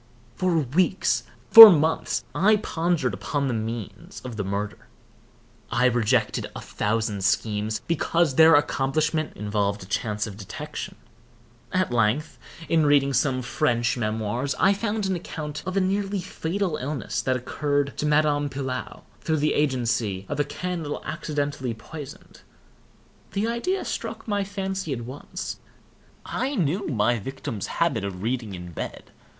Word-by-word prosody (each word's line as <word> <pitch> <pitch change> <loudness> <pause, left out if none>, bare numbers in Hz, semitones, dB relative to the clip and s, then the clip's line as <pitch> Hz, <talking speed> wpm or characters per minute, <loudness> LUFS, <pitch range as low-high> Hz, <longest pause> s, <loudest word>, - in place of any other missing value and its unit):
For 185 -2 +1
weeks, 165 +7 +1 0.3
for 225 -2 +14
months, 160 -3 +1
I 215 +4 +4
pondered 165 - -1
upon 140 +9 -2
the 125 - -1
means 115 - -5
of 125 -3 -7
the 105 - -2
murder. 100 +2 -4 0.8
I 125 - +2
rejected 120 -1 +1
a - - -5
thousand 105 -2 -2
schemes, 105 +2 0
because 170 -1 +1
their 160 +3 +7
accomplishment 150 +2 0
involved 105 -1 -1
a - - -10
chance 105 +1 -2
of 100 -2 -8
detection. 100 -3 -7 0.8
At 185 -6 0
length, 120 +7 +1 0.3
in 165 -1 +3
reading 140 -2 +3
some 130 -1 +1
French 120 -2 +1
memoirs, 110 +3 -2
I 195 - +5
found 210 0 -2
an 190 -1 0
account 155 -3 -6
of 185 +1 -2
a - - +5
nearly 195 +1 0
fatal 180 0 -2
illness 140 0 -3
that 130 - 0
occurred 145 +2 -1
to 150 - 0
Madame 150 -1 +2
Pilau, 130 -2 -5 0.2
through 160 -1 0
the 150 +1 +1
agency 115 -8 0
of 145 - -4
a - - +4
candle 160 +1 -4
accidentally 145 -6 -3
poisoned. 145 +5 -11 0.9
The 200 +2 0
idea 300 +12 -1
struck - - -5
my 205 -2 0
fancy 195 -4 -3
at 120 - -4
once. 130 +4 -7 0.7
I 270 +3 -2
knew 185 - 0
my 120 -3 +1
victim's 110 -2 -5
habit 165 -11 0
of 95 -1 -5
reading 115 -4 -2
in 90 -1 -8
bed. - - -7
145 Hz, 145 wpm, -25 LUFS, 115-170 Hz, 0.9 s, for